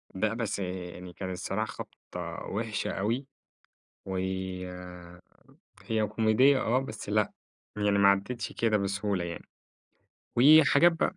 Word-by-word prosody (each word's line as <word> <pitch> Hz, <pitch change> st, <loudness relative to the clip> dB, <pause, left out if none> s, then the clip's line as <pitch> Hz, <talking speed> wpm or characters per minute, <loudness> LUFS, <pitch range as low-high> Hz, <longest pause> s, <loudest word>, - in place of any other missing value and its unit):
لأ، 110 Hz, +4 st, 0 dB
بس 115 Hz, -3 st, -2 dB
آآ، -, -, -1 dB
يعني 90 Hz, -1 st, -7 dB
كان 95 Hz, +1 st, -5 dB
الصراحة 95 Hz, +4 st, -2 dB
خبطة -, -, -8 dB
وحشة 110 Hz, +1 st, -2 dB
أوي. 115 Hz, +7 st, -1 dB, 0.8 s
و 95 Hz, -1 st, -4 dB, 1.7 s
هي 110 Hz, -2 st, 0 dB
كوميدية 110 Hz, +6 st, +4 dB
آه، 125 Hz, +3 st, +2 dB
بس 110 Hz, -6 st, -7 dB
لأ، 105 Hz, 0 st, +2 dB, 0.5 s
يعني 105 Hz, -1 st, +2 dB
ما 100 Hz, 0 st, +6 dB
عَديتش 105 Hz, +4 st, -1 dB
كده 110 Hz, -2 st, +2 dB
بسهولة 100 Hz, -1 st, -1 dB
يعني. 85 Hz, -, -7 dB, 0.9 s
وحاجات 155 Hz, +5 st, +7 dB
بقى. 170 Hz, +3 st, -1 dB
105 Hz, 125 wpm, -29 LUFS, 100-120 Hz, 1.7 s, وحاجات